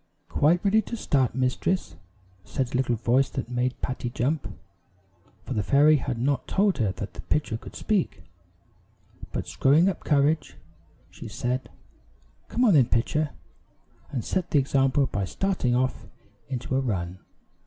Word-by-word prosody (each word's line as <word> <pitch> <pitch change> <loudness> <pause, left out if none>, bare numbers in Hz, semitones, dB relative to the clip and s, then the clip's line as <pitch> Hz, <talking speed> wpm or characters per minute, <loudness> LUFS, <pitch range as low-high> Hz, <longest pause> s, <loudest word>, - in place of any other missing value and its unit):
"Quite 170 +6 +2
ready 215 +2 +4
to 235 - -6
start, 130 - +1
mistress," 130 - 0 0.5
said 125 +5 -3
a - - -1
little 125 -2 +1
voice 120 +4 +2
that 125 -2 -5
made 125 +1 -1
Patty 130 -1 -3
jump, 130 0 -1 1.0
for - - -4
the 105 - 0
fairy 145 +8 +5
had 130 -3 -3
not 130 +2 0
told 195 -4 +2
her 105 -5 +2
that 100 +2 -6
the - - -8
pitcher 150 -7 -1
could 115 - -9
speak; 185 - -1 1.1
but - - -3
screwing 150 +7 +4
up 195 - -2
courage, 145 +1 +1 0.5
she - - -9
said: 125 +3 -3 0.8
"Come 250 - +1
on, 215 - +5
then, 135 -6 +5
Pitcher," 150 +6 +1 0.8
and 125 -5 -4
set 185 -2 -1
the - - +2
example 135 0 +3
by 100 -6 -2
starting 130 - 0
off 130 +1 -1 0.4
into 130 0 -3
a - - +3
run. 90 -7 -3
130 Hz, 155 wpm, -26 LUFS, 120-150 Hz, 1.1 s, fairy